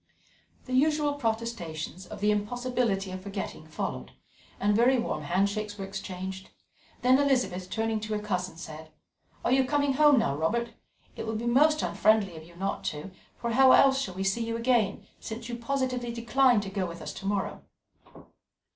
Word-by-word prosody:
The 255 - -6
usual 295 +2 +3
protestations 220 - -3
of - - -9
the 210 0 +3
impossibility 210 -2 -1
of 185 0 -6
forgetting 195 -5 -6
followed, 65 - -5 0.5
and 205 +1 +2
very 245 +4 +4
warm 240 - -2
handshakes 200 +3 -1
were 195 - -4
exchanged; 190 -1 -6 0.5
then 255 +2 +5
Elizabeth, 245 -10 +1
turning 225 +1 -1
to 215 0 -4
her 210 - 0
cousin, 185 -4 -3
said: 155 -1 -9 0.6
"Are - - +2
you 265 +1 +5
coming 285 +1 +1
home 295 0 +6
now, 140 - +2
Robert? 230 +10 0 0.4
It - - -5
will 220 - -2
be 225 +2 -3
most 300 +6 +4
unfriendly 215 -4 +2
of 160 - -9
you 170 +1 -16
not 195 +3 -3
to, 150 +6 -4 0.3
for 235 - -3
how 260 +2 +7
else 270 0 +5
shall 190 -9 -4
we 190 - -2
see 195 +4 +1
you 230 0 -2
again, 230 -4 +1
since 230 +1 -7
you 240 - -3
positively 250 0 -2
decline 240 0 +3
to 200 - -5
go 190 -2 -1
with 170 0 -8
us - - -5
to 195 - -7
morrow?" 200 -1 -2
220 Hz, 175 wpm, -28 LUFS, 190-250 Hz, 0.6 s, how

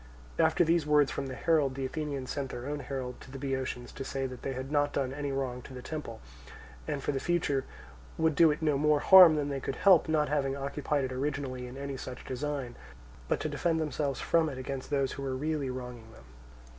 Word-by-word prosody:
After 160 +2 +4
these 165 -2 +2
words 150 -2 +4
from 135 - -3
the 130 - -6
herald, 145 -5 +2
the 135 -1 -3
Athenians 140 -2 -4
sent 140 -2 -3
their 120 0 -6
own 145 +1 -3
herald 130 -3 -5
to - - -12
the 135 - -7
Boeotians 130 -2 -3
to 135 - -6
say 135 0 -3
that 130 -1 -6
they 135 - -3
had 130 +2 -6
not 145 -1 +2
done 135 -1 -1
any 145 0 -3
wrong 130 -2 -2
to 130 - -11
the 125 - -8
temple, 150 -8 -6 0.7
and 140 - -3
for - - 0
the 135 - -2
future 145 -5 0 0.5
would 160 -1 +2
do 165 +3 +6
it 150 +1 -1
no 150 -3 +2
more 150 0 +3
harm 180 -1 +9
than 145 -1 -1
they 140 -1 -2
could 135 - -4
help; 185 -5 +5
not 155 -1 +2
having 140 -2 0
occupied 140 +1 -1
it 130 - -3
originally 130 -1 -3
in 125 +2 -9
any 140 -1 -5
such 125 -1 -8
design, 135 -1 -3 0.5
but - - 0
to - - -1
defend 165 -2 0
themselves 150 -3 -2
from 165 -2 +2
it 135 - -7
against 130 0 -5
those 140 -2 +1
who - - -6
were 135 -1 -2
really 150 0 -2
wronging 125 -3 -7
them. 85 - -16
140 Hz, 225 wpm, -30 LUFS, 130-150 Hz, 0.7 s, harm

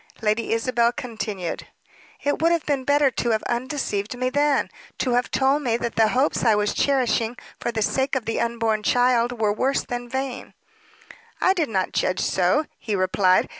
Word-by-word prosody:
Lady 215 +1 0
Isabel 235 +1 +2
continued, 220 - -5 0.6
"It 285 +2 0
would 330 +1 +4
have 335 -2 0
been 280 -3 0
better 285 -1 +3
to 240 - -2
have 220 -1 +1
undeceived 240 -3 -2
me 255 +1 -1
then; 290 0 +1 0.3
to 255 - -1
have 245 +1 +1
told 270 +2 +2
me 235 -5 0
that 235 -1 -4
the 225 -1 +4
hopes 255 +6 +1
I 225 -3 +4
was 210 0 0
cherishing 245 -4 +1 0.2
for 240 - -2
the 220 -2 -1
sake 265 +5 0
of 255 -4 -2
the 225 - -1
unborn 230 -2 0
child 245 +1 +2
were 210 -2 +2
worse 265 +6 0
than 245 0 -5
vain." 265 0 -4 0.8
"I 375 - +4
did 330 -8 -1
not 190 -4 -1
judge 185 - 0
so," 190 - +2
he 215 -3 -2
replied. 185 0 +3
240 Hz, 180 wpm, -23 LUFS, 220-265 Hz, 0.8 s, would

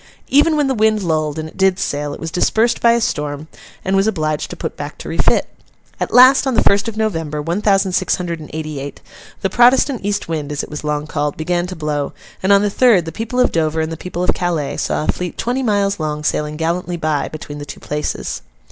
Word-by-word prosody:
Even 300 +3 +4
when 295 - +2
the 270 - +1
wind 215 -2 +2
lulled, 155 -3 0
and 155 0 -4
it 160 - -15
did 190 -1 +3
sail, 145 -6 -2
it - - -7
was 165 0 -5
dispersed 225 +7 +2
by 235 0 +5
a 235 - +1
storm, 150 -5 -2 0.4
and 190 +1 +1
was 195 +2 +3
obliged 155 -7 -1
to - - -6
put - - -5
back - - -7
to - - -9
refit. - - +2 0.5
At - - -2
last, 260 +2 +7
on 260 - +1
the - - +4
first 200 +2 +3
of 220 -1 -5
November, 165 -9 -1
one 170 +7 -2
thousand 195 -2 +3
six - - +1
hundred 170 -2 -4
and 155 - -10
eighty 155 -2 -4
eight, 140 +1 -7 0.4
the 195 - 0
Protestant 250 +1 +4
east 205 0 -1
wind, 155 -3 -3
as 145 - -2
it - - -9
was 150 - -6
long 150 0 -1
called, 150 -1 -2
began 175 +2 -1
to 185 - -6
blow; 150 -3 -2 0.3
and 190 - +2
on 200 0 +6
the 205 - +1
third, 220 -7 +4
the 165 - -5
people 225 +8 -3
of 250 - +4
Dover 160 -1 0
and 160 0 -1
the - - -3
people 175 +1 -4
of - - +2
Calais 160 -6 -2
saw - - -1
a - - -4
fleet 180 -1 -5
twenty 250 +3 -1
miles 205 -4 +1
long 150 -1 -3
sailing 150 0 -1
gallantly 170 +2 -1
by, 155 -3 0
between 145 -1 -8
the - - -6
two 135 - -9
places. 150 0 -3
170 Hz, 240 wpm, -18 LUFS, 150-205 Hz, 0.5 s, last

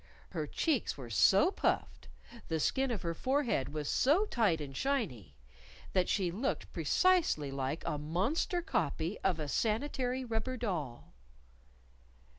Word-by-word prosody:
Her 150 - -3
cheeks 290 - 0
were 125 -4 -8
so 195 - +5
puffed, - - -1 0.4
the 160 -1 -1
skin 265 - +1
of 230 -5 -3
her 170 -1 -1
forehead 255 - 0
was 150 -1 -4
so 315 +11 +3
tight 215 - +1
and 140 -3 -7
shiny, 215 - -2 0.6
that 185 -2 +2
she 185 -4 +1
looked 215 +10 -3
precisely 345 - +2
like 135 +3 -3
a 150 - -2
monster 205 - 0
copy 165 - -1
of 185 -4 0
a 150 - -3
sanitary 250 - -1
rubber 235 +2 -2
doll! 165 - -4
195 Hz, 135 wpm, -33 LUFS, -, 0.6 s, so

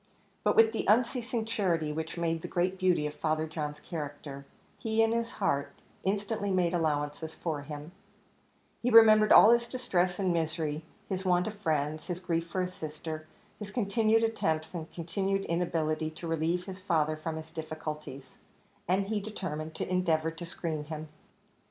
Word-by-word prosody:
But - - +3
with 225 0 +7
the 225 - -3
unceasing 235 +1 +2
charity 175 -9 0
which 160 +2 -4
made 165 -1 0
the - - -5
great 185 +2 0
beauty 180 -5 +3
of 150 - -3
Father 155 0 0
John's 150 -2 -4
character, 145 -3 -6 0.3
he, 225 0 +2
in 225 - +2
his 230 0 -1
heart, 140 0 0 0.3
instantly 205 +1 -1
made 180 -2 +2
allowances 155 -1 -1
for 155 -4 -3
him; 150 +2 -8 0.9
he 245 - +1
remembered 215 -2 +8
all 220 - +10
his 235 0 +3
distress 185 -8 0
and 185 -3 +1
misery 160 -2 -1 0.3
his 190 -1 -2
want 180 -1 +3
of 215 - -3
friends 155 -4 -1
his 175 -1 -3
grief 170 -2 -1
for 185 +2 -1
his 180 0 -4
sister 155 -1 -6 0.3
his 210 -1 -6
continued 225 0 +2
attempts 160 -9 0
and 165 -2 -6
continued 195 +4 -1
inability 160 -2 0
to 160 +2 -8
relieve 165 +2 0
his 185 -1 -8
father 155 -5 +1
from 155 +1 -4
his 160 0 -8
difficulties; 155 -3 -6 0.6
and 190 +3 +2
he 210 +1 -1
determined 160 -7 -5
to - - -3
endeavour 165 -3 +1
to 165 +2 -8
screen 160 -3 -3
him. 155 0 -6
170 Hz, 165 wpm, -30 LUFS, 155-195 Hz, 0.9 s, all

